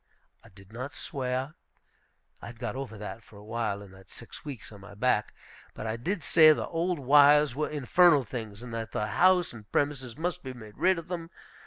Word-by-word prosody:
I 115 - -16
did 100 +1 -18
not 130 +4 -6
swear. 130 0 -3 0.9
I - - -8
had 115 0 -10
got 120 +1 -4
over 130 -5 -6
that 105 +2 -7
for 105 -1 -17
a 100 - -13
while, 110 -2 -3
in 100 - -14
that 95 0 -17
six 115 - -11
weeks 140 -8 -8
on 100 -2 -12
my 105 +1 -12
back. 110 -1 +1 0.4
But - - -6
I 110 0 -2
did 170 - -3
say 155 -2 +7
the - - -3
old 170 +2 -1
wires 145 0 +6
were 150 +1 -1
infernal 150 +1 +4
things, 110 -2 -7
and 120 -2 -8
that 115 -1 -5
the 105 - -1
house 180 +9 +3
and 110 -3 -13
premises 135 -4 -1
must 180 +2 -2
be 130 -1 -7
made 110 -4 -12
rid 185 -1 +3
of 165 - -7
them. 170 -2 -5
125 Hz, 210 wpm, -28 LUFS, 110-150 Hz, 0.9 s, say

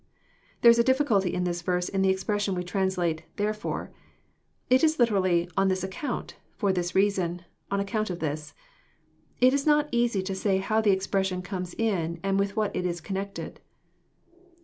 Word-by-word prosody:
] - - -35
There 235 - +10
is 235 - +3
a - - +6
difficulty 235 -8 +2
in 180 0 -1
this 175 -1 -2
verse 180 +1 0
in 195 - -1
the 190 - +3
expression 195 +1 0
we 180 - -2
translate 180 -3 -1
" - - -39
therefore.'* 210 +1 -3 0.8
It 255 +3 +4
is 315 0 +3
literally, 185 -7 +2
" - - -31
on 195 - +3
this 185 -1 0
account, 190 +10 -4 0.2
Tfor 200 -4 +2
this 175 -1 -2
reason,— 185 -3 +1 0.3
on 200 - 0
account 215 +2 -1
of 180 - -3
this." 150 -2 -4 0.9
It 255 +1 +6
is 280 +1 0
not 295 0 +4
easy 235 -5 +1
to 195 +1 -3
say 190 0 +1
how 215 +3 +1
the 215 - +2
expression 190 -1 0
comes 180 -1 -5
in, 170 -7 -1
and 195 0 +1
with 200 0 -1
what 215 -2 -1
it 180 - -1
is 175 -1 -3
connected. 195 +3 -5
195 Hz, 190 wpm, -27 LUFS, 180-215 Hz, 0.9 s, There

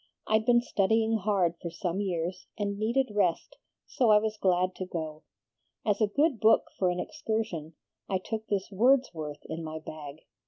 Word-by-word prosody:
I'd 220 +1 +2
been 240 -1 +6
studying 225 0 +2
hard 185 -5 +1
for 170 - -4
some 175 +2 -2
years, 180 -1 -3
and 200 -1 -2
needed 235 +3 +1
rest, 205 - 0 0.3
so 245 -4 +1
I 210 - +8
was 215 0 0
glad 185 -2 +2
to 185 - -3
go. 155 -3 -5 0.6
As 210 +1 +1
a 215 - +5
good 280 +3 +1
book 220 +2 +5 0.2
for 185 - +3
an 180 0 -1
excursion, 215 - -3 0.3
I 190 - +2
took 220 +4 -5
this 200 -1 -2
Wordsworth 195 - +1
in 160 +1 -5
my 155 0 -5
bag. 155 -1 -9
200 Hz, 170 wpm, -29 LUFS, 170-220 Hz, 0.6 s, I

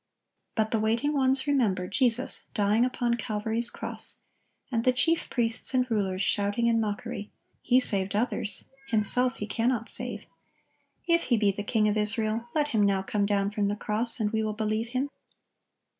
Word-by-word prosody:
But 220 -1 0
the 225 - +1
waiting 230 +7 0
ones 265 -1 +2
remember 220 -11 +1
Jesus 250 +3 +1
dying 210 +3 +2
upon 240 -1 -1
Calvary's 220 +2 -1
cross, - - -6 0.5
and 230 -2 0
the 255 - +4
chief 325 +7 +1
priests 230 +1 +1
and 255 -1 +3
rulers 195 -3 0
shouting 205 +4 0
in 230 -1 +3
mockery, 210 -1 -4 0.3
"He 250 +1 +3
saved 200 -5 -1
others; 215 -1 -2 0.2
Himself 245 +3 +3
He 210 - -5
cannot 230 +2 -1
save. - - +2 0.8
If 335 -1 +2
He 240 - +2
be 205 -2 +3
the 200 - -5
King 215 +1 +1
of 210 0 0
Israel, 220 +2 +2
let 295 -1 +1
Him 220 -6 +1
now 195 -1 +1
come 200 +1 -1
down 200 -1 0
from 205 -1 -1
the 205 - -1
cross, 220 +4 -1
and 210 -1 0
we 220 -1 0
will 215 -1 -2
believe 215 +1 -2
Him." 260 +4 -3
225 Hz, 175 wpm, -27 LUFS, 210-245 Hz, 0.8 s, the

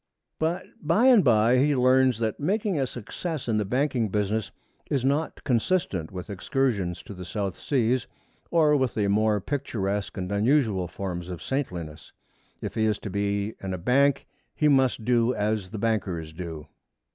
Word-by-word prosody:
But 165 +3 -1 0.2
by 170 +10 +3
and 245 -7 +7
by 120 0 +4
he 145 +2 +3
learns 130 -1 +4
that 110 -1 -2
making 195 +2 0
a 135 - +1
success 140 - -5
in 110 -2 +1
the 105 - 0
banking 125 0 0
business 105 +1 -1 0.4
is 135 -2 0
not 145 +4 -1
consistent 115 - 0
with 90 -1 -7
excursions 100 -4 -1
to - - -9
the 90 -1 -8
South 95 +2 -4
Seas 125 -2 +1 0.4
or 155 -3 +4
with 130 -4 0
the 105 -2 +1
more 105 +1 +2
picturesque 105 -6 -3
and 90 0 -4
unusual 105 -3 +2
forms 90 -1 -5
of 85 -3 -6
saintliness. 85 - -4 0.5
If - - -4
he 110 - +1
is 105 -1 +1
to 100 - -7
be 100 +1 -1
in 95 -1 -3
a - - -5
bank 135 +9 +2 0.3
he 150 - +2
must 130 -5 +3
do 120 0 +2
as 105 -2 -1
the 110 - -6
bankers 95 -8 -1
do. 80 -3 -7
110 Hz, 170 wpm, -26 LUFS, 100-135 Hz, 0.5 s, and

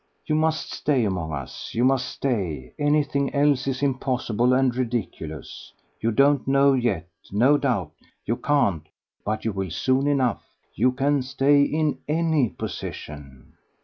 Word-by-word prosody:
"You 155 - -1
must 155 +1 0
stay 135 -6 +1
among 90 -5 -2
us 70 -3 -7
you 120 +2 +2
must 130 -1 +2
stay; 95 - -3
anything 145 -1 +1
else 140 -2 +2
is 135 +1 -2
impossible 125 -3 0
and 130 -1 +2
ridiculous; 115 -11 -4 0.3
you 115 - 0
don't 140 +3 +3
know 140 +1 +4
yet, 115 -11 0 0.2
no 125 +9 +4
doubt 125 -10 -1 0.3
you 115 +3 -1
can't; 100 - +1 0.3
but 110 +1 -3
you 110 - +1
will 95 -2 -3
soon 130 - +1
enough: 130 -6 +1 0.3
you 125 +4 +2
can 140 +2 +1
stay 135 +2 +3
in 150 +1 0
ANY 155 -5 +2
position." 70 -4 -8
130 Hz, 145 wpm, -24 LUFS, 105-140 Hz, 0.3 s, know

